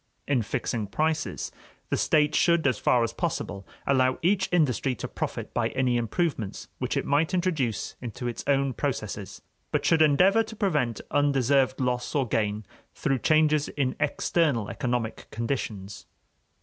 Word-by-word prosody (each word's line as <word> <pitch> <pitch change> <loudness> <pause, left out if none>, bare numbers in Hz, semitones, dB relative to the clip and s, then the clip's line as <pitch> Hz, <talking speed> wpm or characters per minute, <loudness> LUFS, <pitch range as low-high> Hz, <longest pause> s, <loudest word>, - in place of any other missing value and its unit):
In 135 -4 +2
fixing 110 0 -2
prices, 155 +10 -1 0.4
the - - +3
state 150 -1 +2
should, 170 -1 +3
as 130 -6 +2
far 120 -1 +3
as 115 0 -2
possible, 115 - -3 0.2
allow 130 -1 +3
each 190 +2 +2
industry 140 -6 +2
to - - -5
profit - - -5
by - - +1
any 130 -2 +2
improvements 120 - -2
which - - -1
it - - -1
might 155 +6 +2
introduce 155 - -1
into 120 0 -5
its 120 - -4
own 140 -1 +2
processes, - - -4 0.3
but - - 0
should 165 -1 +4
endeavor 180 +8 +5
to 220 0 -6
prevent 150 - 0
undeserved 135 -2 +2
loss 125 0 -1
or 135 -3 +2
gain 105 -1 -1 0.3
through 135 -1 0
changes 155 +1 +3
in 130 -3 -1
external 145 -6 +1
economic 120 -3 -3
conditions. 110 -5 -4
135 Hz, 150 wpm, -27 LUFS, 120-155 Hz, 0.4 s, endeavor